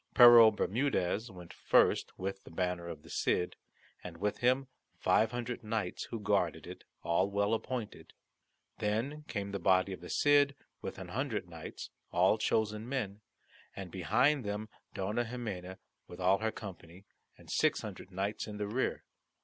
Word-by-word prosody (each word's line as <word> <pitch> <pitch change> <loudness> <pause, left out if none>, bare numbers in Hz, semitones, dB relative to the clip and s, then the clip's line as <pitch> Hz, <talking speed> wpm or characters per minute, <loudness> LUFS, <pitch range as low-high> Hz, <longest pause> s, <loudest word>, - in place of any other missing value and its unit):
Pero 120 -2 +10
Bermudez 110 -1 0
went 90 -3 -11
first - - +3
with 95 +1 -4
the - - -13
banner 90 0 -2
of 80 -3 -7
the - - -14
Cid, 90 - 0 0.5
and 85 -2 -8
with 105 +3 -1
him 130 +2 +2 0.3
five 110 - +3
hundred 120 0 -4
knights 105 -4 -2
who 115 - -5
guarded 105 - 0
it, - - -9 0.2
all 90 +4 +2
well 100 +2 +1
appointed. 115 -1 -4 0.7
Then 120 +9 -1
came 100 -1 -3
the 100 - -3
body 95 +1 +3
of 95 - -9
the 90 - -9
Cid 145 -1 +4 0.3
with - - -6
an - - -8
hundred - - -2
knights, - - -8 0.2
all - - +3
chosen 110 +1 0
men, 110 -7 -3 0.5
and 95 -3 -7
behind 120 - +2
them 105 +1 -4 0.3
Dona 105 +5 -1
Ximena 100 -7 -5 0.3
with 90 - -11
all 95 +2 +3
her 110 0 0
company, 95 -3 -10 0.3
and - - -12
six - - +2
hundred - - -8
knights 100 +4 -3
in 105 -1 -6
the 105 - -2
rear. 115 +6 -1
105 Hz, 160 wpm, -32 LUFS, 95-120 Hz, 0.7 s, Pero